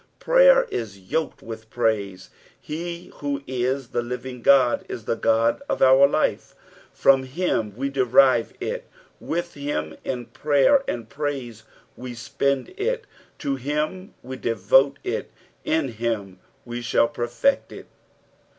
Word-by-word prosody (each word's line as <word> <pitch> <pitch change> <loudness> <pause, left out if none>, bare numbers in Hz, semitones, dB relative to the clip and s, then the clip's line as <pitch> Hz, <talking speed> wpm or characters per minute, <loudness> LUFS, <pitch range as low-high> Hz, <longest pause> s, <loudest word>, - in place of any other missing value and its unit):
Prayer - - +6
is 110 -5 -4
yoked 100 +12 -3
with 110 -1 -9
ptaise. 100 -5 -1 0.3
He 170 +2 -6
who 140 -1 -3
is 130 0 -2
the 120 - -1
living 125 +1 -6
Ood, 130 -3 +5
is 110 - -6
the 115 - 0
God 115 - +2
of - - -1
our 135 +1 +7
life, - - -1 0.4
from 135 -1 +4
him 130 - -2
we 135 +2 -1
derive 130 -2 +4
it, - - -4 0.3
with 175 +1 -3
him 140 - -3
in 125 -2 -3
prayer 150 - +3
and 115 -2 -3
praise 130 -5 -5 0.3
we 125 -1 -8
spend 130 +3 -1
it, 475 +5 -1 0.3
to 140 -1 -2
him 150 +8 -3
we 130 +1 -7
devote 130 +6 +3
it, - - -3 0.3
in 160 -4 0
him 110 -5 -3 0.3
we 120 0 -5
shall 120 +4 +2
perfect 145 - 0
it. - - -10
130 Hz, 135 wpm, -24 LUFS, 115-145 Hz, 0.4 s, our